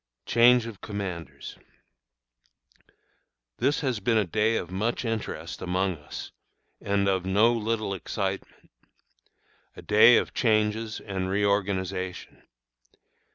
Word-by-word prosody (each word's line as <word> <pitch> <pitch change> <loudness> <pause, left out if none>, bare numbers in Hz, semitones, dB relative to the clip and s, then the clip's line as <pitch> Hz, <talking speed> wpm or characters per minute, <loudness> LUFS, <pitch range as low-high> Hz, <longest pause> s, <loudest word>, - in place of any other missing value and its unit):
CHANGE 120 0 +5
OF 115 -4 -9
COMMANDERS. 95 -5 -6 2.0
This 145 - +1
has 130 -6 -1
been 115 +3 +1
a 105 - +2
day 110 +5 +1
of 90 - -5
much 110 +7 -2
interest 115 -1 -4
among 90 0 -1
us 75 - -9 0.5
and 100 0 0
of 95 -2 +1
no 105 +5 +3
little 110 -3 -2
excitement 95 +1 -5 1.0
a - - -11
day 110 +3 +7
of - - -1
changes 110 -1 0
and 95 -2 -4
reorganization. 95 -2 -2
105 Hz, 110 wpm, -26 LUFS, 95-115 Hz, 2.0 s, day